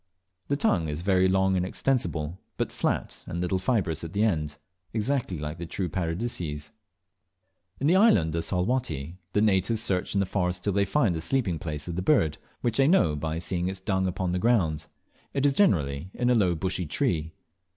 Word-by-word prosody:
The 140 - +1
tongue 90 - +1
is 75 +3 -4
very 95 -1 +3
long 95 0 +2
and 90 - +1
extensible, 90 - -1 0.2
but - - -1
flat - - -2
and 85 - -4
little 90 +1 0
fibrous 95 - 0
at 80 - -6
the 100 +2 +2
end, 75 -8 0 0.4
exactly 115 -4 -1
like 75 +2 -5
the 85 - -5
true 90 +1 -3
Paradiseas. 85 -2 -3 1.1
In 135 - -1
the 165 +5 +5
island 95 - +4
of 85 0 -1
Salwatty, 90 - -1
the 105 - +3
natives 105 +2 +2
search 95 -2 -1
in - - +3
the 100 - +2
forests 90 -2 -1
till 100 +2 -1
they 100 +1 +2
find 110 -2 +2
the 80 - -3
sleeping 95 -6 0
place 75 -2 -4
of 85 - -4
this 90 - -2
bird, 85 - +2 0.2
which 120 -2 0
they 135 0 +5
know 90 - +4
by 80 +2 -3
seeing 90 +1 -2
its 95 0 -3
dung 95 -1 0
upon 90 0 -2
the 90 - 0
ground. 95 -9 +1 0.5
It 135 0 +1
is 140 - +4
generally 80 - +2
in 125 0 +1
a - - +5
low 95 -7 +3
bushy 90 0 -2
tree. 80 +2 -1
90 Hz, 195 wpm, -27 LUFS, 80-110 Hz, 1.1 s, the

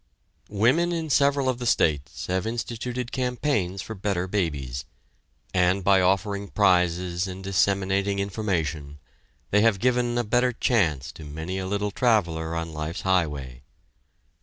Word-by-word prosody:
Women 130 +12 +2
in 165 -3 -2
several 140 0 +3
of 130 -1 0
the 120 - -3
states 75 - +1
have 95 +3 -1
instituted 120 +1 -4
campaigns 125 -7 -1
for 110 - -6
"Better 95 -3 -1
Babies," 70 -10 -2 0.7
and 95 +1 +2
by 95 0 +5
offering 100 +2 +1
prizes 90 -2 +2
and 95 0 -7
disseminating 100 +1 +1
information, 85 -8 -2 0.5
they 105 - +4
have 110 -2 +4
given 120 +2 +1
a 120 - +1
better 125 +3 +2
chance 80 - +1
to 80 - -12
many 80 +6 -5
a 95 - -4
little 100 +1 -1
traveler 85 -9 +1
on 80 -1 -4
life's 75 +3 -4
highway. 75 -9 -1
95 Hz, 135 wpm, -25 LUFS, 85-115 Hz, 0.7 s, by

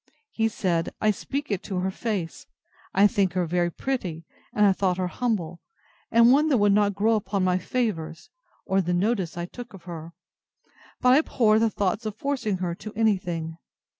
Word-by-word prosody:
He 225 0 +1
said, 175 -6 -1
I 215 - +3
speak 275 +6 -4
it 195 - -1
to 190 - -3
her 185 +1 -1
face, 190 -6 -4 0.4
I 195 +2 +5
think 200 -3 +2
her 180 -1 0
very 175 +1 +1
pretty, 175 -7 -4 0.3
and 210 - +3
I 195 - +5
thought 185 -2 0
her 185 - 0
humble, 180 -5 -2 0.5
and 235 +1 +6
one 300 +4 +4
that 270 - +4
would 205 -1 +4
not 205 -1 +2
grow 215 +3 +2
upon 200 -2 0
my 185 0 +2
favours, 165 -8 -3 0.3
or 195 0 +2
the 180 0 -1
notice 190 -3 0
I 170 - -2
took 240 +3 -10
of 185 - -14
her; 170 -1 -8 0.9
but 250 0 +6
I 275 - +7
abhor 220 -8 +3
the 225 0 +3
thoughts 205 +2 -1
of 210 - -5
forcing 240 -6 -1
her 180 -2 -2
to 210 +4 -8
any 220 -2 +3
thing. 165 -2 -5
195 Hz, 195 wpm, -25 LUFS, 175-225 Hz, 0.9 s, I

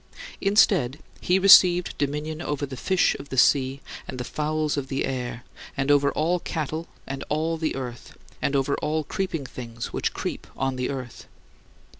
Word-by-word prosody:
Instead, 195 - +3 0.2
he 180 - +2
received 180 -2 +7
dominion 150 +2 -2
over 145 -4 -2
the 135 -1 -8
fish 185 +8 +2
of 140 0 -10
the 130 - -5
sea, 135 +1 +3 0.3
and - - -6
the - - -2
fowls 155 +3 -1
of 140 -2 -3
the 135 0 -1
air; 125 -2 -4 0.3
and 135 +1 +1
over 140 0 +4
all 170 +4 +1
cattle, 160 0 -4 0.2
and 135 0 -5
all 160 +2 0
the 160 -1 -2
earth; 125 -2 -7 0.2
and 140 - 0
over 140 +1 +1
all 155 +1 -1
creeping 165 -3 -3
things 115 -2 -7
which - - -1
creep - - -5
on 135 -1 -1
the 125 0 -2
earth. 130 -3 -6
145 Hz, 170 wpm, -25 LUFS, 130-160 Hz, 0.3 s, received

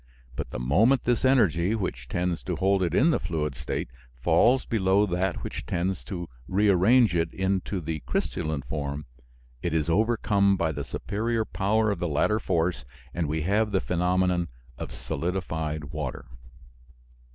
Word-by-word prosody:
But - - -4
the - - -5
moment 100 - +3
this 120 0 +1
energy, 105 - +3
which 65 - -4
tends 90 -1 -1
to 90 - -2
hold 95 +3 +2
it 85 -1 0
in 160 +5 +5
the - - +1
fluid 75 -3 -2
state, 65 -1 -4 0.3
falls 125 - +3
below 100 -2 +2
that 90 -1 -1
which - - -5
tends 90 +1 -1
to 90 -3 -5 0.2
rearrange 105 +3 +4
it 85 -1 +1
into 95 0 -1
the 80 -2 -4
crystalline 75 -3 -2
form, 70 -1 -4 0.6
it 85 -2 -1
is 80 +1 +1
overcome 100 -1 +2
by 80 -3 0
the - - -4
superior 110 +2 -2
power 105 +2 +1
of 100 - -3
the 85 - -1
latter 85 +8 +1
force, 85 -2 0 0.3
and 85 -3 -1
we 80 +1 -1
have 105 +4 +1
the 95 - +2
phenomenon 90 0 +1 0.3
of - - -7
solidified 80 -3 -3
water. 75 -4 -4
90 Hz, 155 wpm, -26 LUFS, 80-105 Hz, 0.6 s, in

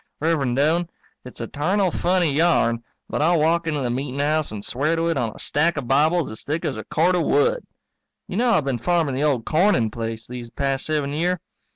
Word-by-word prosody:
Rev'rend 145 -6 +1
Doane, 165 +4 +2 0.4
it's 125 - -10
a - - -2
tarnal 185 - 0
funny 175 -4 +1
yarn 125 -8 +2 0.2
but - - -2
I'll 170 +2 +3
walk 165 +2 +2
into 150 -3 -1
the 125 -2 -1
meetin' 130 +2 -3
house 155 -1 0
and 105 -1 -6
swear 150 +6 0
to 165 +1 0
it 165 - 0
on 120 -5 -1
a - - -11
stack 155 +3 0
o'Bibles 150 +4 +2
as 110 - -7
thick 155 +3 -3
as - - -1
a 110 - -6
cord 175 +4 +2
of 180 - +2
wood. 475 +3 +2 0.6
You 185 - -4
know 245 +2 +2
I've 155 -11 +2
been 130 -3 -1
farming 165 0 +1
the 135 +3 -1
old 135 -7 +1
Corning 155 - +2
place 115 -1 -5
these 120 -1 -8
past 135 +1 -2
seven 150 -2 -1
year? 175 +3 0
150 Hz, 215 wpm, -22 LUFS, 130-170 Hz, 0.6 s, I'll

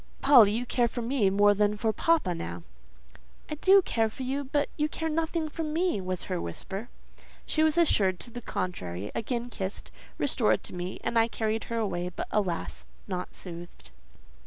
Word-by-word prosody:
"Polly, 245 -8 +7
you 240 +3 -1
care 240 0 +2
for 235 +1 -4
me 235 -4 +2
more 205 +1 +5
than 210 +1 +1
for 220 +1 0
papa, 320 - +2
now—" 85 - -6 0.9
"I - - 0
do 380 +6 +5
care 225 -7 +1
for 260 - -7
you, 270 +3 -1
but 285 +2 0
you 300 0 0
care 320 +1 -3
nothing 320 0 -1
for 315 +2 -5
me," 320 - 0
was 185 -1 -2
her 185 -2 -3
whisper. 195 - -6 0.6
She 310 - 0
was 315 +1 +3
assured 195 - +3
to 240 - -9
the 245 - -7
contrary, 100 - -4
again 240 +1 -3
kissed, 190 -2 -5 0.3
restored 255 -5 +2
to - - -9
me, 180 +1 -5
and 235 - +2
I 225 - +4
carried 220 -1 -2
her 230 - -3
away; 180 -5 -1
but, 180 - -5
alas! 185 -5 -1 0.2
not 180 -2 -4
soothed. 175 -1 -8
225 Hz, 180 wpm, -28 LUFS, 185-285 Hz, 0.9 s, Polly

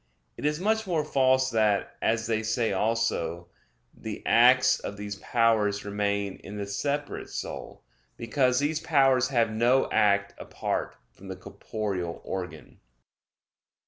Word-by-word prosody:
It - - -7
is 150 +1 -1
much 220 +2 0
more 160 -4 0
false 130 -2 +2
that, 105 -3 +1
as 115 0 +1
they 110 -1 0
say 110 0 0
also, 95 -5 -1 0.4
the - - -7
acts 130 +2 +5
of 100 - -6
these 105 0 -6
powers 105 -2 +1
remain 100 -1 -2
in 105 +1 -9
the 100 - -3
separate 145 +8 -3
soul; - - -7 0.3
because 125 +2 +1
these 150 +3 0
powers 135 -5 +3
have 115 -4 +1
no 120 +4 +3
act 100 -2 +2
apart - - -3 0.2
from 100 - -14
the 95 - -5
corporeal 95 -2 -5
organ. 90 -2 -7
115 Hz, 135 wpm, -27 LUFS, 100-130 Hz, 0.4 s, acts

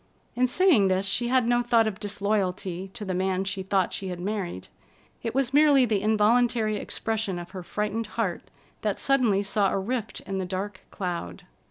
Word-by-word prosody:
In 250 +1 +3
saying 280 - +4
this, 190 +1 +1
she 235 +5 +1
had 250 -1 +2
no 240 0 +3
thought 235 -2 +3
of 210 -2 -3
disloyalty 195 -3 -2
to 215 -3 -5
the 190 - -2
man 185 +1 0
she 195 0 -3
thought 190 -1 0
she 195 - -4
had 180 -1 -5
married. 185 - -4 0.5
It 230 +1 -4
was 265 -1 +1
merely 290 -3 +6
the 210 -4 0
involuntary 220 +1 +2
expression 215 -2 -2
of 175 0 -8
her 185 -1 -6
frightened 210 +4 -3
heart 200 -7 -2 0.3
that 210 -2 -1
suddenly 240 -8 +2
saw 200 -1 +1
a - - 0
rift 220 +3 -3
in 190 0 -4
the 190 - -2
dark 190 +1 -4
cloud. 170 - -5
205 Hz, 185 wpm, -26 LUFS, 190-230 Hz, 0.5 s, merely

